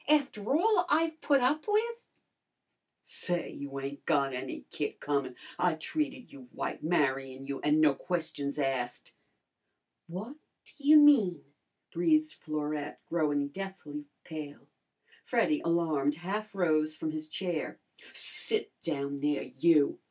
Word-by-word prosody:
"After 275 -6 +2
all 370 0 +3
I've 320 +1 +2
put 280 -2 +4
up 290 +8 +1
with!" 460 +3 0 1.0
"Say, 175 -1 -1
you 140 -1 -6
ain't 140 +1 -6
got 140 -3 +2
any 130 +1 -5
kick 145 - -3
comin'! 140 -3 -1 0.2
I 175 -2 +3
treated 275 - -3
you 130 -3 -12
white, - - -4
marryin' 135 -4 0
you, 140 0 -4
an' 150 +1 +3
no 155 -2 +6
questions 150 -3 -3
asked." 135 -4 -2 0.9
"What 210 - -6 0.3
ta - - -19
you 295 +2 +7
mean?" 235 - +6 0.5
breathed 310 - +3
Florette, 150 -1 -4
growing 145 -4 +1
deathly 155 -5 -7 0.2
pale. 150 -3 -8 0.6
Freddy, 305 -1 +2
alarmed, 160 -4 +1
half 200 +5 -4
rose 155 -4 +1
from 155 - -2
his 155 0 -6
chair. 175 -2 -3 0.3
"Sit 435 -1 0
down 140 -3 -2
there 145 0 0
you!" 150 +1 +3
160 Hz, 130 wpm, -31 LUFS, -, 1.0 s, you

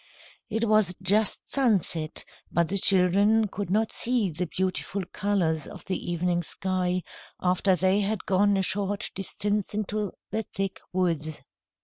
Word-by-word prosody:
It 225 +1 0
was 215 -4 +3
just 205 +3 +1
sunset, 190 - 0 0.3
but 170 -2 +1
the 200 - +3
children 200 +4 +5
could 200 -1 -5
not 215 +3 +1
see 235 -6 +1
the 175 +3 -3
beautiful 190 +2 -2
colours 175 -7 0
of - - -11
the 185 -2 -3
evening 175 0 0
sky, 180 +1 -1 0.4
after 185 +1 +2
they 185 +3 +2
had 205 0 -1
gone 200 +1 +3
a 190 - +1
short 200 +1 0
distance 205 +1 -2
into 210 -1 -2 0.2
the 220 +2 0
thick 195 -1 -2
woods. 165 -4 -1
190 Hz, 140 wpm, -26 LUFS, 180-205 Hz, 0.4 s, children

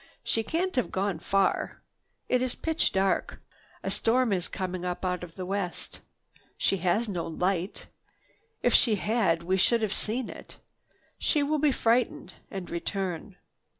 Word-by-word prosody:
"She 225 - +1
can't 340 - -1
have 250 - +1
gone 190 -3 0
far. 195 +2 +1 0.4
It 250 0 +2
is 255 -1 -1
pitch 320 0 +1
dark. 190 0 +1 0.4
A - - -1
storm 240 -1 +3
is 180 -2 0
coming 185 -1 -4
up 180 +1 -2
out 180 -1 -1
of 170 -2 -9
the 185 - -4
west. 195 -2 -3 0.6
She 195 - +2
has 185 +6 +1
no 180 -5 -2
light. 180 +3 -1 0.8
If - - +3
she 225 -5 +5
had, 200 -5 +1
we 185 +2 +1
should 230 +4 +3
have 210 -1 0
seen 235 +3 -2
it. - - -10 0.6
She 300 -3 +2
will 300 +1 +1
be 295 0 +4
frightened 235 -1 +1 0.2
and 190 -3 -5
return." 185 +1 -3
195 Hz, 155 wpm, -28 LUFS, 180-235 Hz, 0.8 s, she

